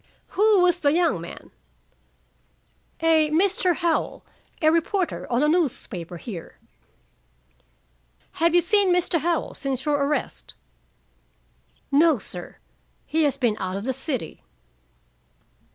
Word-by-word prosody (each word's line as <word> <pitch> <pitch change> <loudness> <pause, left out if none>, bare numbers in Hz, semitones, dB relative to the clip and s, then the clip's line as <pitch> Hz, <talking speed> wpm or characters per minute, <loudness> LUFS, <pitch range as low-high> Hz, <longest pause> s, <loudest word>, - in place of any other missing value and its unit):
"Who 420 -1 +3
was 360 -1 +3
the 285 -3 +2
young 330 - +1
man?" 170 - -10 1.5
"A 320 -2 +4
Mr. 360 +2 +2
Howell, 335 -1 -1 0.3
a 315 -2 +4
reporter 335 0 -1
on 240 +4 +2
a - - +3
newspaper 230 - -1
here." 175 -3 -9 1.8
"Have 335 +1 +4
you 350 - +6
seen 395 +2 +3
Mr. 355 -1 +1
Howell 335 +1 -1
since 265 -2 -4
your 295 -1 +2
arrest?" 295 +1 -3 1.4
"No, 305 +1 +4
sir. 180 -4 -6 0.5
He 320 0 +1
has 285 - +1
been 235 -5 0
out 185 0 -3
of 200 - -6
the 260 - -1
city." 265 - -4
310 Hz, 120 wpm, -24 LUFS, 255-345 Hz, 1.8 s, you